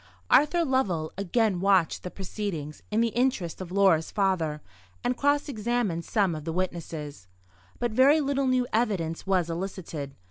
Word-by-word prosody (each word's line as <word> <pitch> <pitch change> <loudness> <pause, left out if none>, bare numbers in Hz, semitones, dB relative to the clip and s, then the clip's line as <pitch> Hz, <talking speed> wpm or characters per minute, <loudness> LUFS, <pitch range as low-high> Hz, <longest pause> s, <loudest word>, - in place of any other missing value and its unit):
Arthur 335 +3 +4
Lovell 190 - 0
again 200 0 +1
watched 190 -3 +2
the 180 - -5
proceedings 180 -6 -5
in 215 +2 +1
the 230 - +2
interest 230 -8 -1
of 180 -1 -7
Laura's 185 -5 +3
father, 185 -7 0 0.4
and 250 +1 +1
cross 285 +2 +1
examined 225 - -1
some 200 -6 +1
of 155 -1 -6
the 165 - -3
witnesses. 160 - -4 0.5
But 240 -1 -1
very 270 +7 +5
little 275 -2 0
new 255 -1 +2
evidence 195 -8 -1
was 185 -3 +2
elicited. 165 -5 -5
195 Hz, 150 wpm, -27 LUFS, 165-240 Hz, 0.5 s, very